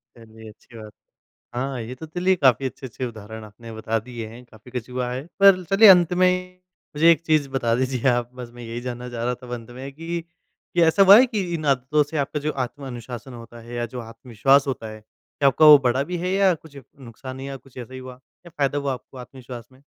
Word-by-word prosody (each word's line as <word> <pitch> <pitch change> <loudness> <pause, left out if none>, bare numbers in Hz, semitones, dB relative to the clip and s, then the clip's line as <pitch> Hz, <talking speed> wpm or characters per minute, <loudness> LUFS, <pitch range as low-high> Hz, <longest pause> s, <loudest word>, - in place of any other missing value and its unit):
चलिए, 110 -1 -14
अच्छी 115 +2 -16
बात 110 - -9
है। 105 - -19 0.5
हाँ, 135 -2 -3
ये 120 +3 -7
तो 160 - -9
चलिए 180 +4 +1
काफ़ी 135 -4 +3
अच्छे-अच्छे 130 -1 -6
उदाहरण 110 -1 -9
आपने 115 +2 -12
बता 110 0 -2
दिए 120 -3 -6
हैं, 115 +3 -12
काफ़ी 110 +2 -17
कुछ 125 -1 -5
हुआ 125 -1 -3
है। 130 +3 -5
पर 195 -2 +6
चलिए 200 +1 +7
अंत 180 -2 +6
में 180 0 +1 0.4
मुझे 165 +3 +6
एक 165 -1 +2
चीज़ 155 -3 +2
बता 120 -4 0
दीजिए 130 +1 -1
आप 120 -1 0
बस 125 -2 -8
मैं 120 - -10
यही 115 +1 -6
जानना 125 0 -6
चाह 120 -1 -5
रहा 125 0 -1
था 125 - -14
अब 125 - -6
अंत 120 0 -8
में 135 +1 -7
कि, 165 +2 -5 0.5
कि 175 - +3
ऐसा 165 +5 +5
हुआ 200 +2 +9
है 255 - +6
कि 225 -5 -2
इन 155 -2 -3
आदतों 140 +2 +2
से 150 +2 -6
आपका 145 +1 -2
जो 150 +1 -2
आत्म 140 +2 -12
अनुशासन 120 0 -8
होता 120 0 -11
है 120 +1 -11
या 120 0 -2
जो - - -3
आत्मविश्वास 120 +4 +1
होता 120 -4 -4
है 110 0 -10
क्या 140 +5 -4
आपका 155 +4 +3
वो 150 -1 +11
बढ़ा 130 +2 +1
भी 180 - -2
है 180 +2 -3
या 195 -1 +3
कुछ 155 -2 -16 0.2
नुकसान 130 +2 -10
या 135 0 -6
कुछ 135 -1 -20
ऐसा 125 +1 -8
ही 130 - -7
हुआ 130 -1 -11 0.3
या - - -11
फायदा 140 0 0
हुआ 140 -2 -1
आपको 125 +2 -11
आत्मविश्वास 125 -2 -10
में? 130 +2 -22
130 Hz, 235 wpm, -23 LUFS, 120-150 Hz, 0.5 s, वो